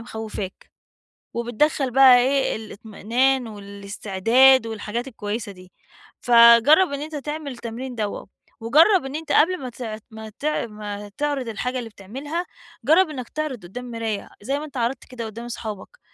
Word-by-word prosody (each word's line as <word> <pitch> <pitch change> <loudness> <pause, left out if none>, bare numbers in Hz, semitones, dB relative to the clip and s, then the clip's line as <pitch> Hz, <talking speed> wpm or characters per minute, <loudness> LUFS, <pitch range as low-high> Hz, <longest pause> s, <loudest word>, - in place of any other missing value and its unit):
مخوّفاك، 220 -4 -7 0.6
وبتدخل 245 +4 0
بقى 260 0 +7
إيه، 265 +2 +1
الاطمئنان 225 +4 -1
والاستعداد 205 +5 +2
والحاجات 225 +3 -4
الكويّسة 210 -3 -5
دي. 185 -1 -16 0.5
فجرّب 240 +8 +6
إن 280 - -3
أنتَ 305 +1 -6
تعمل 295 0 -5
التمرين 245 +1 -7
دَوّة، 210 -4 -4 0.3
وجرّب 315 - +4
إن 270 +1 -6
أنتَ 320 0 -4
قبل 365 +4 +4
ما 255 - -4
تع 225 -3 -6
ما 220 0 -9
تع 300 -4 -1
ما 210 -1 -7
تعرض 285 -4 -1
الحاجة 250 +4 -3
اللي 235 -2 -6
بتعملها، 275 - -6 0.4
جرّب 325 +7 +5
إنّك 255 -5 -6
تعرض 300 -8 -4
قدّام 245 +8 -8
مراية، 225 -3 -4
زي 275 +7 -1
ما 300 - -6
أنتَ 285 -3 -11
عرضت 240 +2 -2
كده 240 -2 -7
قدّام 230 +2 -8
صحابك، 225 - -7
240 Hz, 150 wpm, -23 LUFS, 220-275 Hz, 0.6 s, بقى